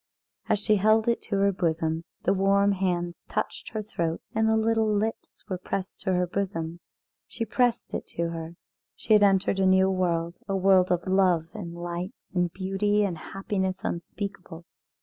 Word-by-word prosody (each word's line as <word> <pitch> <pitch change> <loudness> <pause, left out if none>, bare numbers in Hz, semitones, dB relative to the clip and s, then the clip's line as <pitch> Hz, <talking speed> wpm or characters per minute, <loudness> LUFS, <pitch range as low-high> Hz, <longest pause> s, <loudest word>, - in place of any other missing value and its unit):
As - - +4
she 210 +1 +2
held 215 +3 +3
it 235 - +2
to 200 - 0
her 200 0 +3
bosom 165 -2 -1 0.2
the - - +3
warm 200 +1 +3
hands 175 -3 -1
touched - - -3
her 215 -1 -4
throat, 170 -5 -2
and 220 0 +2
the 220 - +3
little 220 0 +2
lips 215 +2 -2
were 185 -3 -3
pressed 185 +1 -4
to 190 -1 -1
her 180 0 +2
bosom. 175 -3 -3 0.5
She 230 - -4
pressed 245 +2 0
it - - -4
to 170 0 0
her. 165 0 -6 0.4
She 220 - +1
had 210 - +7
entered 195 -1 +3
into - - +2
a 190 0 +5
new 190 0 +4
world, 170 -2 -1
a 195 - -1
world 190 -1 +4
of 175 -1 +1
love 185 -4 +2
and 175 -6 -7
light 175 +2 -5 0.2
and 175 -2 +1
beauty 195 +3 +1
and 190 -4 -1
happiness 190 +2 -3
unspeakable. 175 -1 -5
190 Hz, 180 wpm, -27 LUFS, 175-205 Hz, 0.5 s, had